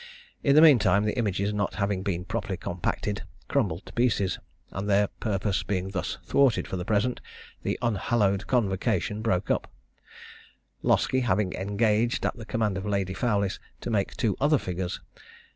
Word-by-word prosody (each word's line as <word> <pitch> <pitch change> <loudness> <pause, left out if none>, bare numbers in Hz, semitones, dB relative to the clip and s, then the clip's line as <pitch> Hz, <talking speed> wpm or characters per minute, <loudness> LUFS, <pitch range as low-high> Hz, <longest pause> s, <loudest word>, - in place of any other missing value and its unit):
In 140 -1 +3
the 155 - +8
mean 150 -6 +8
time, 100 0 +3
the 105 - 0
images 100 -3 0
not 100 -1 -1
having 100 -2 0
been 90 -2 -2
properly - - -3
compacted, - - -2 0.3
crumbled 80 +3 0
to - - -12
pieces; 105 -6 +1 0.3
and 100 +2 -4
their 100 0 +3
purpose 100 -2 0
being 95 -1 -2
thus 95 -2 -3
thwarted 135 -5 +3
for - - -4
the 90 -1 -4
present, 110 +4 0 0.4
the - - -1
unhallowed 105 -2 +1
convocation 105 -2 0
broke 95 -5 0
up, - - -1 1.1
Loskie 130 - +2
having 100 -5 +1
engaged, 105 +4 +1
at - - 0
the 115 - -9
command 105 -4 -1
of 95 - -6
Lady 100 -2 0
Fowlis, 100 -2 0 0.2
to - - -4
make 100 -3 0
two 110 -7 +1
other 150 +2 +4
figures. 90 -4 -4
105 Hz, 160 wpm, -27 LUFS, 95-115 Hz, 1.1 s, the